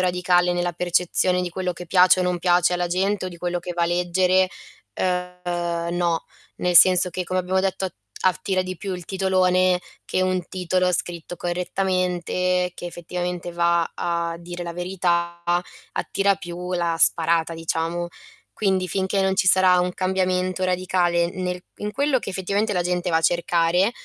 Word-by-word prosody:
radicale 180 0 +2
nella 175 0 -1
percezione 180 +1 +1
di 180 - -3
quello 180 +1 -2
che 180 - -8
piace 185 +1 +5
o - - +2
non 180 -1 0
piace 175 0 +3
alla 175 0 0
gente 190 +2 0
o - - -3
di 175 - -10
quello 175 0 -2
che 175 0 -6
va 175 - 0
a 170 - +3
leggere, 180 +2 +2 0.5
ehm, 175 -2 -2
no. 170 -2 0 0.3
Nel 180 -1 -1
senso 180 +1 +7
che 180 +1 -3
come 185 +1 -1
abbiamo 185 +1 0
detto 190 0 -1
at 185 - -4 0.3
attira 185 +1 +1
di 185 -1 -6
più 195 +2 -5
il 180 -2 -8
titolone 185 -1 +2 0.2
che 185 - -1
un 185 -1 0
titolo 185 0 0
scritto 175 0 -4
correttamente 180 0 -1
che - - -9
effettivamente 175 0 -4
va 170 0 +1
a 170 -1 -2
dire 175 +1 -7
la 170 -1 -6
verità, 175 -1 -1 0.5
attira 200 0 +1
più 180 -1 -6
la 170 -1 0
sparata, 165 0 +3
diciamo. 165 +1 -2 0.4
Quindi, 190 -3 0
finché 195 +2 0
non 190 0 +1
ci 190 - +2
sarà 185 0 +5
un 180 0 -1
cambiamento 185 0 0
radicale 180 -2 +1
nel 180 -1 -4
in 210 0 -5
quello 280 0 +1
che - - -8
effettivamente 200 +3 -1
la 180 - +1
gente 180 0 -1
va 160 - +2
a - - +2
cercare, 175 +3 +2
180 Hz, 170 wpm, -23 LUFS, 175-185 Hz, 0.5 s, senso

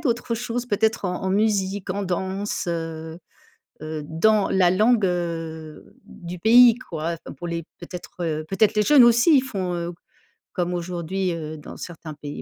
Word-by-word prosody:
d'autres 240 -5 -1
choses 240 +1 -3
peut-être 220 -1 0
en 180 0 -3
en 190 - -1
musique, 200 -2 0
en 200 +2 -2
danse? 190 +2 -3
Heu 165 -1 -4 0.6
heu, 155 0 -5
dans 200 +6 +2
la 185 -2 +4
langue, 215 +4 +3
heu, 165 -3 -4
du 175 +1 -9
pays, 235 +4 +7
quoi. 165 +1 -3
Enfin, - - -8
pour 175 - -7
les 170 0 -3 0.2
peut-être, 175 +1 -9
heu, 155 -1 -2
peut-être 205 +3 +2
les 210 - +2
jeunes 275 +2 +7
aussi, 240 +7 +5
ils 260 - +4
font, 190 -9 -3
heu, 170 0 -3 0.6
comme 175 0 -1
aujourd'hui, 180 +1 -2
heu, 155 -2 -5
dans 150 - -10
certains 165 -2 -8
pays, 145 0 -7
180 Hz, 170 wpm, -23 LUFS, 165-215 Hz, 0.6 s, pays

